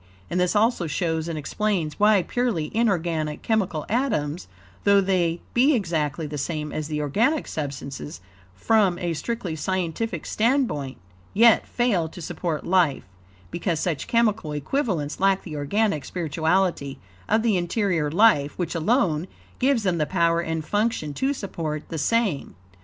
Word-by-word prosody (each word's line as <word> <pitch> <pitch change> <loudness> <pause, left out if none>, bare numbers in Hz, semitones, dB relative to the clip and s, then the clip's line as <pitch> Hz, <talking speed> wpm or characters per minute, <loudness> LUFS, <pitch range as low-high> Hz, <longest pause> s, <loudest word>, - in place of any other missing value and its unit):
And 180 - 0
this 180 +3 +1
also 210 -4 +2
shows 160 -1 -1
and 165 -2 -3
explains, 165 +1 -2
why 210 -2 +5
purely 215 -6 -1
inorganic 170 -9 0
chemical 190 -9 0
atoms, 180 - -1 0.4
though 200 0 +5
they 180 -3 +1
be 270 +5 +4
exactly 160 - -1
the 150 0 -5
same 150 +1 -3
as 155 -1 -3
the 150 -1 -3
organic 225 - +1
substances, 140 - -5 0.4
from 200 - +2
a 175 -1 -2
strictly 185 0 -3
scientific 180 +2 -2
standpoint, 220 - 0 0.4
YET 230 +1 +5
FAIL 205 -10 +1
TO 175 - -11
SUPPORT 165 -2 -3
LIFE, 175 -6 +2 0.5
because 170 -1 -1
such 160 -6 -2
chemical 220 -9 +1
equivalents 155 - -2
lack 195 0 +2
the 160 -4 -7
organic 155 +3 0
spirituality 160 -2 0 0.3
of 220 - +3
the 225 -4 +2
interior 175 -3 0
life, 155 -5 +3
which 175 -2 -2
alone, 170 - +1 0.3
gives 260 -3 +2
them 180 -4 +1
the 150 - +1
power 170 -2 +2
and 160 -2 -3
function 205 -8 -1
to 265 - 0
support 165 - -4
the 165 - -4
same. 210 -2 0
175 Hz, 145 wpm, -24 LUFS, 155-215 Hz, 0.5 s, why